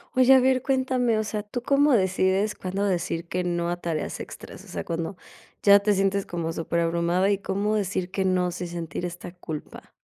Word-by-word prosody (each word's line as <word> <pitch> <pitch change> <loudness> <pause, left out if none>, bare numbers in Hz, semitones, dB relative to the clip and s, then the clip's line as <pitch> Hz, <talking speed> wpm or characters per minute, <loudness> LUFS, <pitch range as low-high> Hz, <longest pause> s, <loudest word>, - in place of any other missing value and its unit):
Oye, 255 0 +5
a - - +7
ver, 260 0 +3
cuéntame, 255 -3 +1
o 215 - +1
sea, 210 0 -3
¿tú 225 +4 -6
cómo 285 +1 +4
decides 190 +1 +2
cuándo 190 +2 -3
decir 170 -3 -1
que 180 +1 -2
no 175 -1 -1
a 175 - -2
tareas 165 -3 -3
extras? - - -9
O - - -16
sea, - - -5
cuando 170 +3 -3 0.5
ya 200 0 +8
te 205 +1 +1
sientes 195 0 +1
como 165 -2 -3
superabrumada, 170 +3 +1
¿y 200 - +1
cómo 200 +2 -1
decir 190 -3 -2
que 190 0 -1
no 180 -1 +1
sin 175 0 -5
sentir 170 0 -5
esta 175 0 -7
culpa? 160 -4 -8
190 Hz, 195 wpm, -25 LUFS, 175-210 Hz, 0.5 s, ya